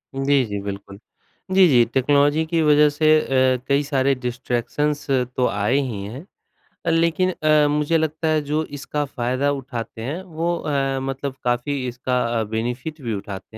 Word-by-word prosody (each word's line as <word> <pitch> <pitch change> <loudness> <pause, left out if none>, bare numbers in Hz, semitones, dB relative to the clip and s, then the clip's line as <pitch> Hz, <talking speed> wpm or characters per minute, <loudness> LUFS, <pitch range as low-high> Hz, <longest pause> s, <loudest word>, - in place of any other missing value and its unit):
जी, 135 0 +2
जी, 100 -1 -4
बिल्कुल। 100 0 -7 0.5
जी, 190 0 +6
जी, 120 -5 +5
टेक्नोलॉजी 145 +3 +3
की 165 0 0
वजह 150 0 +5
से 145 +2 -1
अ, 130 -2 +2
कई 140 +1 +3
सारे 140 -1 +1
डिस्ट्रैक्शंस 125 +4 -2
तो 125 -1 +1
आए 105 +5 0
ही 120 -8 -3
हैं, 125 - -8 0.6
अ, - - +1
लेकिन 170 +3 +2
अ, 155 -3 +3
मुझे 150 +2 +1
लगता 160 +1 -1
है 155 -1 +2
जो 150 +2 -1
इसका 145 +1 -3
फायदा 130 +1 -1
उठाते 125 -5 -6
हैं, 145 +10 -4
वो 170 0 -2
अ, 135 -3 -1
मतलब 135 0 -4
काफ़ी 125 +2 -1
इसका 125 +1 -1 0.2
अ, - - 0
बेनिफिट 125 +7 -3
भी 115 -4 -3
उठाते 100 +1 -7
135 Hz, 165 wpm, -22 LUFS, 125-150 Hz, 0.6 s, जी